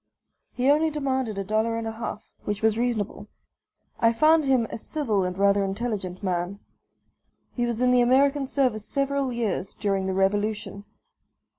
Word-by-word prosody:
He 255 +1 0
only 310 +2 +3
demanded 265 -7 -2
a 195 - -1
dollar 220 +3 0
and 230 - -4
a 225 - -2
half, 225 -1 -7
which 205 +1 -3
was 220 -1 +3
reasonable. 230 -3 -2 0.7
I 230 - +4
found 310 +5 +4
him 260 -4 +3
a - - -4
civil 220 -9 -1
and 180 0 -3
rather 200 0 +3
intelligent 195 -2 -3
man; 180 +1 -2 1.0
he 240 -1 -1
was 235 0 -2
in 250 0 +4
the 250 -1 +5
American 275 +3 +3
service 255 -6 0
several 275 +1 0
years, 215 -4 -2
during 195 -2 -1
the 190 - -1
Revolution. 205 +1 -1
225 Hz, 160 wpm, -25 LUFS, 200-260 Hz, 1.0 s, the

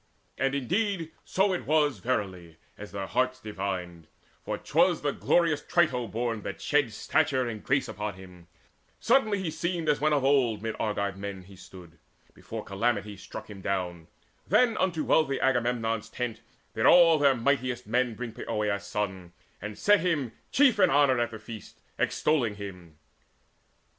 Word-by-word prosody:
And 135 0 +1
indeed 175 - -1
So 190 0 +1
was 150 -6 +1
it - - -21
verily, 95 -9 -3 0.2
as 105 - -10
their 100 -1 -4
hearts 130 +5 0
divined; 95 -6 -5 0.4
For - - -3
'twas - - +2
the - - +1
glorious 165 -4 +2
Trito 125 -10 +1
born 115 0 -2
that 100 - -6
shed 145 -6 +1
Stature 130 +3 +1
and 110 -3 -6
grace 135 -1 +1
upon 105 -3 -4
him. 90 -2 -14 0.5
Suddenly 220 -6 +2
He 165 - -2
seemed 170 0 -2
as 150 -2 +2
when 155 +1 +3
of 145 -3 +2
old 125 -7 +2
mid 110 -1 -3
Argive 100 -2 -1
men 100 -1 -6
He 95 +2 -15
stood, 90 -3 -14 0.3
before - - -7
calamity 105 0 -1
struck 95 - -9
him 100 -2 -10
down. 90 -4 -3 0.4
Then 245 -2 +4
unto 170 -4 0
wealthy 140 -4 +2
Agamemnon's 120 -3 0
tent 120 -3 -4 0.3
Did - - +2
all 165 -3 +7
their 140 -2 +4
mightiest 125 -1 0
men 120 +1 0
bring 120 -1 -5
Poeas' 105 -2 -2
son, 95 -4 -4 0.3
And 105 0 -6
set 205 0 +4
him 160 -9 0 0.2
chief 260 -6 +4
in 185 -2 +6
honour 140 -5 +4
at 120 - +1
the 110 - -8
feast, 110 -1 -11 0.2
Extolling 125 -9 +1
him. 90 -6 -9
120 Hz, 160 wpm, -28 LUFS, 100-145 Hz, 0.5 s, all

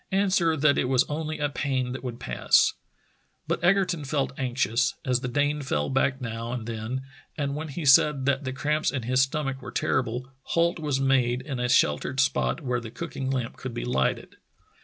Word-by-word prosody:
answer 190 -4 +2
that 145 0 +3
it - - +1
was 130 -1 +4
only 155 +1 -4
a 150 - 0
pain 130 -3 -2
that 130 0 -6
would 120 -2 -5
pass. - - +3 0.7
But - - -1
Egerton 180 -3 +2
felt 140 -1 -1
anxious, 125 -1 0
as 125 -1 +2
the 125 - -3
Dane 145 +3 0
fell 75 - -1
back 135 0 +1
now 115 -1 -4
and 120 -3 -4
then, 115 +3 -4 0.3
and 140 -2 -1
when 155 +2 -4
he 155 +2 -5
said 135 0 +5
that 140 0 +1
the 130 - -3
cramps 150 +4 0
in 130 -4 -3
his 130 +2 +2
stomach 135 0 -1
were - - -7
terrible, 125 +1 -1
halt 170 +4 +1
was 145 -4 -1
made 130 -2 +2
in 135 -2 -4
a 125 0 0
sheltered 95 - +2
spot 140 +3 +1
where 125 -3 -1
the 115 -2 -8
cooking 135 0 -5
lamp 130 -2 -2
could 130 -3 -6
be - - -3
lighted. 125 - -1
135 Hz, 195 wpm, -26 LUFS, 125-150 Hz, 0.7 s, said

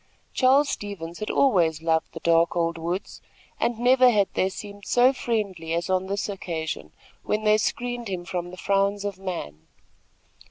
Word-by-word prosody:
Charles 275 +3 +4
Stevens 175 -5 -5
had 215 - -4
always 170 - +2
loved 160 -1 0
the - - -7
dark 170 0 +3
old 170 -1 0
woods, 175 +4 -4 0.4
and 235 -1 0
never 250 +1 +5
had 205 -4 +2
they 190 - +1
seemed 205 +1 -9
so 245 +5 +4
friendly 200 -10 -2
as 170 +2 -2
on 185 0 +1
this 200 +1 -2
occasion, 160 - -5 0.3
when 215 +1 -1
they 215 0 +4
screened 245 +1 -2
him 180 -3 -4
from 175 -1 -4
the 180 - -10
frowns 200 +1 +1
of 200 -2 -4
man. 80 - -6
195 Hz, 165 wpm, -25 LUFS, 170-215 Hz, 0.4 s, never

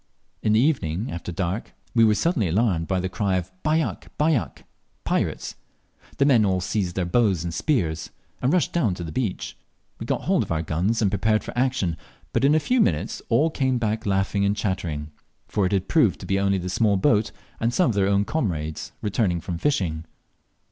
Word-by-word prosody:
In 105 - +2
the 110 - +5
evening, 115 - 0
after 85 +1 -5
dark, 95 +4 -3 0.2
we 115 - +5
were 110 -1 +5
suddenly 115 - +1
alarmed 90 -2 +1
by 95 -1 0
the 95 - -1
cry 95 +1 -1
of 90 0 -4
"Bajak! 155 -5 0
bajak!" 150 -5 0 0.4
(Pirates!) - - -1 0.6
The 140 - +3
men 125 -6 +5
all 95 -2 +2
seized 90 -1 -2
their 90 - 0
bows 95 -2 +2
and 85 -1 -4
spears, 85 - 0 0.3
and 125 - +2
rushed 175 -4 +1
down 115 - +1
to 90 - -6
the 80 - -6
beach; 110 -1 -3 0.4
we - - -6
got - - 0
hold - - +2
of - - -4
our 80 0 0
guns 95 +9 0
and 100 - +2
prepared 110 +2 +1
for - - -8
action, 120 -10 0 0.4
but - - +1
in 145 +2 +5
a - - +5
few 250 +8 +2
minutes 85 - 0
all 145 +8 +3
came 130 -4 +1
back 110 -1 -1
laughing 95 +1 +1
and 100 +1 +1
chattering, 85 -7 -3 0.4
for 100 -3 +1
it - - -4
had 95 -2 0
proved - - +3
to - - -7
be 95 0 +1
only 100 0 +2
a 90 0 -4
small 100 +2 +2
boat 105 0 +2 0.3
and 115 +1 +1
some 135 -1 +2
of - - -3
their 100 -1 +2
own 100 0 +2
comrades 80 - -3
returned 95 -5 0
from 85 -2 -4
fishing. 85 - 0
100 Hz, 205 wpm, -24 LUFS, 90-120 Hz, 0.6 s, the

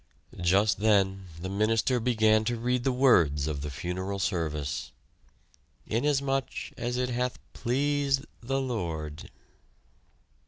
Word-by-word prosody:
Just 95 +5 +3
then 95 -3 +2
the 90 - -4
minister 110 +5 +1
began 110 -2 +3
to 120 +1 0
read 125 +1 0
the 135 - +2
words 85 - +4
of 75 -3 -3
the 75 - -4
funeral 95 +7 -4
service: 75 -8 -2 0.9
"Inasmuch 135 +2 0 0.3
as 120 +1 -2
it 125 0 0
hath 125 +1 -1 0.2
pleased 140 +2 0 0.2
the 135 +3 -1
Lord...." 85 - -4
110 Hz, 115 wpm, -28 LUFS, 90-125 Hz, 0.9 s, words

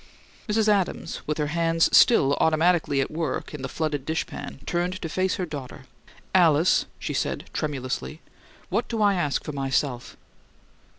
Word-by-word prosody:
Mrs. 215 +1 +2
Adams, 200 -4 0
with 150 - -1
her 150 - 0
hands 165 -1 +3
still 140 - +6
automatically 160 -3 +2
at - - -3
work 155 -3 -3
in 150 - -6
the 135 - -4
flooded 150 -4 -2
dishpan, 160 +3 -4
turned 180 +2 -1
to 165 - -4
face 185 +3 0
her 185 - -2
daughter. 140 -4 -8 0.5
"Alice," 170 -2 +4
she - - -4
said, - - -2
tremulously, 145 +1 -3 0.5
"what - - 0
do 230 - -3
I 205 -1 +4
ask 150 -7 -1
for - - -5
myself?" 135 -2 -2
160 Hz, 155 wpm, -25 LUFS, 145-180 Hz, 0.5 s, still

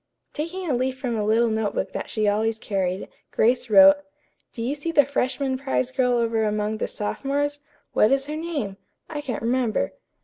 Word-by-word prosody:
Taking 350 +4 -4
a 290 - +1
leaf 255 +1 0
from 250 -3 -2
a 215 - -1
little 225 +2 +3
note 220 -1 -1
book 190 - -2
that - - -5
she 215 -1 0
always 220 +2 +1
carried, 190 -4 -2 0.2
Grace 245 +2 +2
wrote: 290 +6 +8 0.5
"Do 230 - -5
you 255 +4 0
see 295 +3 -3
the 290 -4 +5
freshman 265 -1 -1
prize 265 -2 -1
girl 255 -2 +2
over 230 -2 +1
among 210 0 -1
the - - -1
sophomores? 285 +6 -2 0.3
What 215 - +4
is 270 0 +2
her 300 +1 -4
name? 305 -12 -3 0.3
I 300 -2 -5
can't 250 -6 -4
remember." 235 - 0
245 Hz, 190 wpm, -24 LUFS, 220-285 Hz, 0.5 s, wrote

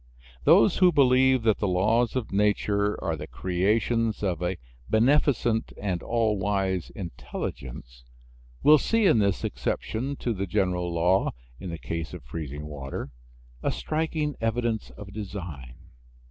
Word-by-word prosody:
Those 115 - +6
who 180 -1 +6
believe 130 -3 +4
that 110 -2 +2
the 105 - 0
laws 110 +7 +2
of 130 -4 -2
nature 105 0 +1
are - - 0
the - - -7
creations 110 +5 0
of 90 -3 -1
a 90 +1 -1 0.3
beneficent 120 -1 +2
and 95 -4 -2
all 110 -3 0
wise 95 -2 -1
Intelligence 60 - -7 0.6
will 150 0 +7
see 225 +6 +2
in 160 - +5
this 100 -2 +1
exception 130 +6 -2
to 120 -3 -2
the 100 -1 -3
general 90 0 0
law 90 +3 +2 0.3
in 95 - -6
the 85 - -5
case 80 0 -5
of - - -10
freezing 75 +2 -6
water 70 -2 -6 0.5
a - - 0
striking 155 -2 -2
evidence 115 -1 -1
of 100 -1 -11
design. 90 - -7
105 Hz, 140 wpm, -26 LUFS, 90-120 Hz, 0.6 s, will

